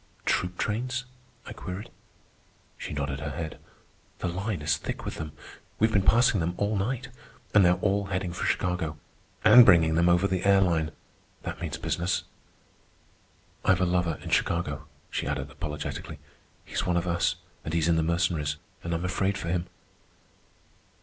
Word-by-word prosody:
"Troop 90 Hz, 0 st, 0 dB
trains?" 125 Hz, +4 st, -1 dB, 0.4 s
I -, -, -7 dB
queried. 95 Hz, +4 st, -7 dB, 0.8 s
She -, -, -7 dB
nodded 70 Hz, -1 st, -2 dB
her 75 Hz, 0 st, -4 dB
head. 80 Hz, +2 st, -5 dB, 0.6 s
"The -, -, -3 dB
line 90 Hz, -1 st, -2 dB
is 75 Hz, 0 st, +3 dB
thick -, -, -5 dB
with -, -, -4 dB
them. 80 Hz, -1 st, -5 dB, 0.5 s
We've 110 Hz, +1 st, +3 dB
been 100 Hz, -, +4 dB
passing 115 Hz, +1 st, +4 dB
them 85 Hz, +1 st, -1 dB
all 105 Hz, +1 st, 0 dB
night. 125 Hz, +6 st, -2 dB, 0.4 s
And 105 Hz, -, +7 dB
they're 90 Hz, 0 st, +5 dB
all 100 Hz, 0 st, +1 dB
heading 95 Hz, -2 st, -2 dB
for 90 Hz, -, -4 dB
Chicago. 90 Hz, -4 st, 0 dB, 0.5 s
And 115 Hz, +3 st, +10 dB
bringing 85 Hz, -6 st, +6 dB
them 85 Hz, +2 st, +4 dB
over 90 Hz, +3 st, +4 dB
the 95 Hz, -1 st, -1 dB
air 100 Hz, 0 st, +5 dB
line—that 80 Hz, -5 st, -3 dB
means -, -, -3 dB
business. 90 Hz, +2 st, -1 dB, 1.4 s
"I've 95 Hz, -1 st, +4 dB
a -, -, +4 dB
lover 90 Hz, -2 st, +1 dB
in -, -, -6 dB
Chicago," 85 Hz, 0 st, 0 dB, 0.2 s
she -, -, -2 dB
added -, -, -3 dB
apologetically. 75 Hz, -1 st, -5 dB, 0.5 s
"He's -, -, -2 dB
one 90 Hz, -1 st, +1 dB
of 85 Hz, -, 0 dB
us, 85 Hz, -2 st, +1 dB, 0.3 s
and 75 Hz, -, -4 dB
he's 80 Hz, -1 st, +1 dB
in 85 Hz, -, +4 dB
the 80 Hz, -, +3 dB
Mercenaries, 80 Hz, -3 st, 0 dB, 0.3 s
and 85 Hz, 0 st, -1 dB
I'm 85 Hz, +2 st, -2 dB
afraid 95 Hz, +2 st, 0 dB
for 85 Hz, -, -4 dB
him." 90 Hz, 0 st, -1 dB
90 Hz, 165 wpm, -28 LUFS, 80-100 Hz, 1.4 s, And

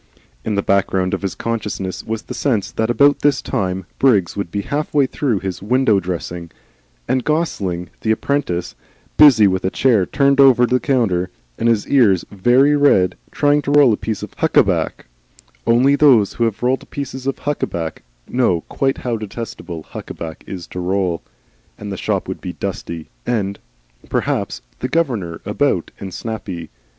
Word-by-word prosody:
In 105 Hz, -, -1 dB
the 100 Hz, -, 0 dB
background 95 Hz, -1 st, +1 dB
of -, -, -1 dB
his 100 Hz, -2 st, -3 dB
consciousness 105 Hz, -5 st, -3 dB
was 110 Hz, 0 st, -4 dB
the -, -, -7 dB
sense 115 Hz, -9 st, 0 dB
that 110 Hz, 0 st, -1 dB
about 140 Hz, +4 st, +4 dB
this 145 Hz, -1 st, +2 dB
time 95 Hz, -7 st, -2 dB
Briggs 105 Hz, -10 st, +3 dB
would 100 Hz, -3 st, -3 dB
be 100 Hz, +3 st, -3 dB
half 150 Hz, +6 st, -2 dB
way 140 Hz, -2 st, +5 dB
through 125 Hz, -, -1 dB
his 95 Hz, -2 st, -4 dB
window 115 Hz, -1 st, +3 dB
dressing, 85 Hz, -2 st, -5 dB, 0.6 s
and 130 Hz, -1 st, +1 dB
Gosling, 100 Hz, -, -1 dB
the 110 Hz, -, -3 dB
apprentice, 110 Hz, -7 st, -1 dB, 0.4 s
busy, 135 Hz, -8 st, +7 dB
with 95 Hz, -1 st, +1 dB
a 95 Hz, -, +1 dB
chair 110 Hz, -4 st, +2 dB
turned 140 Hz, -1 st, +2 dB
down 140 Hz, -1 st, +8 dB
over 125 Hz, -2 st, +5 dB
the 125 Hz, +1 st, +1 dB
counter 105 Hz, -11 st, +1 dB, 0.3 s
and 115 Hz, -, +2 dB
his 110 Hz, -3 st, +1 dB
ears 105 Hz, -10 st, +4 dB
very 125 Hz, +9 st, +4 dB
red, 95 Hz, -11 st, +3 dB
trying 145 Hz, 0 st, +2 dB
to 140 Hz, -, -5 dB
roll 145 Hz, -5 st, +6 dB
a -, -, +2 dB
piece 110 Hz, 0 st, -4 dB
of -, -, -8 dB
huckaback -, -, +1 dB, 0.6 s
only 130 Hz, +4 st, +4 dB
those 130 Hz, -9 st, +5 dB
who 115 Hz, -, +1 dB
have 110 Hz, 0 st, -3 dB
rolled 130 Hz, +2 st, 0 dB
pieces 135 Hz, -2 st, -5 dB
of 135 Hz, -, -1 dB
huckaback 85 Hz, -, -3 dB, 0.3 s
know 120 Hz, -10 st, +1 dB
quite 135 Hz, +9 st, -1 dB
how 120 Hz, -2 st, 0 dB
detestable 105 Hz, -6 st, -7 dB
huckaback 80 Hz, +1 st, -8 dB
is 90 Hz, -3 st, -6 dB
to 90 Hz, -, -7 dB
roll 90 Hz, -2 st, -1 dB, 0.6 s
and 105 Hz, -1 st, -7 dB
the -, -, -3 dB
shop -, -, -2 dB
would -, -, -5 dB
be -, -, -5 dB
dusty 80 Hz, -2 st, -5 dB, 0.2 s
and, 100 Hz, -4 st, -1 dB, 0.5 s
perhaps, -, -, -1 dB, 0.2 s
the -, -, -3 dB
governor 115 Hz, -, -1 dB
about -, -, 0 dB
and 95 Hz, -, -6 dB
snappy. 95 Hz, -6 st, -6 dB
110 Hz, 170 wpm, -19 LUFS, 95-135 Hz, 0.6 s, down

